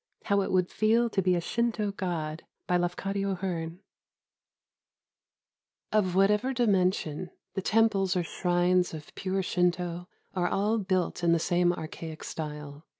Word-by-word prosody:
HOW 200 -1 +2
IT - - -2
WOULD 180 -1 +2
FEEL 230 +2 +3
TO 195 - +1
BE 185 -1 +3
A - - +1
SHINTO 220 +1 0
GOD 165 -5 -3 0.2
BY 180 - +2
LAFCADIO 195 +3 -1
HEARN 175 -2 -4 2.1
Of 190 -4 +2
whatever 210 +7 +3
dimension, 185 - +1 0.2
the 195 - -2
temples 205 -3 +2
or 180 - +1
shrines 175 0 +1
of 150 -1 -10
pure 190 0 -1
Shinto 175 -1 0 0.3
are 180 -2 +1
all 210 +5 +1
built 185 -3 -1
in 170 -1 +4
the - - +4
same 175 +1 +2
archaic 160 -1 -6
style. 150 -1 -6
180 Hz, 140 wpm, -29 LUFS, 175-200 Hz, 2.1 s, in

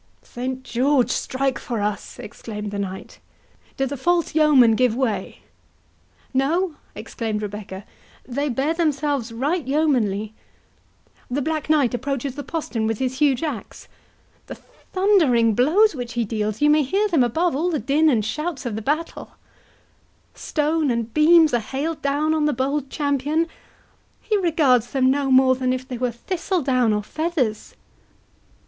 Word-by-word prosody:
"Saint 255 +1 -5
George 260 +1 +1
strike 265 -1 -1
for 235 -3 -4
us!" 205 0 -3
exclaimed 210 -1 -7
the 200 - -4
knight; 190 -1 -6 0.6
"do 270 - +1
the 275 +2 -4
false 340 +6 0
yeomen 295 -7 +5
give 245 0 +2
way?" 225 -7 -2 0.9
"No!" 320 +7 +1 0.2
exclaimed 215 -2 -4
Rebecca, 205 -1 -7 0.4
"they 280 +4 -2
bear 270 +6 0
themselves 290 -6 -1
right 285 +9 -1
yeomanly—the 250 -1 -3
Black 310 0 -3
Knight 290 -6 +3
approaches 270 +1 -3
the 290 - -6
postern 240 -10 -3
with 225 -1 -1
his 260 +2 -3
huge 285 -2 +2
axe—the 280 -10 -9 0.4
thundering 320 - +3
blows 335 - +4
which 245 -4 -6
he 235 -1 -1
deals, 215 +2 -2
you 295 - +5
may 305 0 +4
hear 390 +10 +1
them 325 -10 +3
above 320 +7 0
all 330 +6 0
the 325 - 0
din 290 +6 +2
and 225 -7 +1
shouts 300 +5 -4
of 235 -4 -3
the 220 - -4
battle—Stones 305 +1 -4
and 230 -1 -3
beams 315 0 +5
are 240 - +3
hailed 285 +8 -4
down 290 +3 +1
on 310 -1 +1
the 300 - +2
bold 270 +2 -2
champion—he 300 - -3
regards 295 - +2
them 260 -1 +3
no 280 0 0
more 260 0 +5
than 255 0 -1
if 255 0 -3
they 250 -2 -6
were 250 0 0
thistle 350 - -3
down 255 -4 +2
or 210 0 0
feathers!" 295 - -2
270 Hz, 145 wpm, -22 LUFS, 235-310 Hz, 0.9 s, yeomen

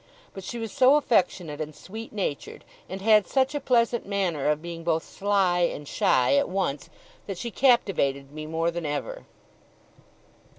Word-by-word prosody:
But 195 - -8
she 240 - -6
was 225 -2 -5
so 260 +2 +5
affectionate 180 - +1
and 155 -1 -6
sweet 220 +4 -9
natured, 195 -9 -4 0.2
and 190 +1 -6
had 215 -1 +5
such 265 +1 +1
a 290 - -1
pleasant 235 -3 +1
manner 185 -8 -1
of 150 0 +1
being 170 0 -7
both 165 -1 0
sly 195 -3 +1
and 160 -4 -1
shy 125 -1 +2
at - - +1
once, 180 -7 -2 0.4
that 195 -3 -5
she 235 +4 -5
captivated 170 - +2
me 155 +1 -7
more 165 +2 0
than 170 -2 -4
ever. - - -5
185 Hz, 165 wpm, -26 LUFS, 155-225 Hz, 0.4 s, so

